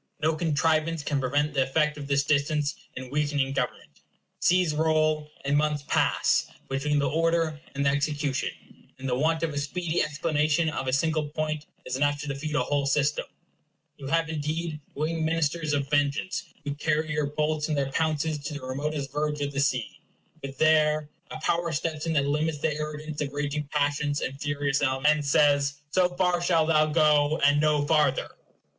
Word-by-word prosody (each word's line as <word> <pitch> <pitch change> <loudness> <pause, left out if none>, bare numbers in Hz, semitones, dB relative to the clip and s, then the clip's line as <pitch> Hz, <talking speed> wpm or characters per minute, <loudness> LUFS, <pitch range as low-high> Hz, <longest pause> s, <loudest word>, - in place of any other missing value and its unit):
No 160 +1 +1
contrivance 160 0 +1
can 145 -2 0
prevent 145 +3 0
the 135 - +2
effect 150 +3 +1
of 145 -2 -7
this 140 0 +2
distance 145 +1 +1 0.2
in 130 0 -7
weakening 145 -2 0
government. 100 - -4 0.4
Seas 180 -3 +3
roll, 155 -1 +1 0.2
and 140 +1 +2
months 150 -1 +1
pass, - - +2 0.2
between 145 +2 0
the 140 -1 +2
order 165 +1 +1 0.2
and 140 0 0
the 140 - +4
execution, 145 -1 -1 0.5
and 135 0 -6
the 125 - 0
want 160 +4 +1
of 160 -2 -1
a 145 - -1
speedy 165 +3 -1
explanation 155 +1 +1
of 135 -3 -4
a - - +1
single 155 +2 +1
point 155 0 -3 0.2
is 130 0 -3
enough 145 +1 +1
to 150 - -6
defeat 145 +2 -3
a 130 - +2
whole 140 +1 0
system. 145 +1 +1 0.7
You 135 - -8
have, 165 +2 +1
indeed, 155 +1 -3 0.2
winged 160 +2 -1
ministers 160 -1 0
of 140 -1 0
vengeance, 145 +6 0 0.2
who 145 0 -3
carry 155 +1 -1
your 150 -1 0
bolts 150 +1 -1
in 155 - +1
their 135 -1 -1
pounces 155 0 0
to 145 +1 -6
the 140 -3 -7
remotest 140 +1 -3
verge 150 +1 -1
of 145 0 -2
the 140 - -2
sea. 125 -5 -1 0.4
But 135 -1 -7
there 155 -1 +3 0.2
a 155 - -7
power 170 +1 0
steps 155 +1 -2
in 165 - 0
that 140 -3 +2
limits 150 +2 0
the 155 +1 0
arrogance 150 0 -5
of 140 -2 -2
raging 145 0 -2
passions 145 0 0
and 135 +2 -4
furious 145 -1 0
elements, 135 +1 +3
and 155 -1 -3
says, 145 -1 +3 0.2
SO 180 +2 +2
FAR 180 -1 +1
SHALL 170 -2 +3
THOU 155 -1 +3
GO, 150 -1 +4
AND 145 +1 +4
NO 150 -1 +2
FARTHER. 150 -4 +2
150 Hz, 185 wpm, -27 LUFS, 145-155 Hz, 0.7 s, the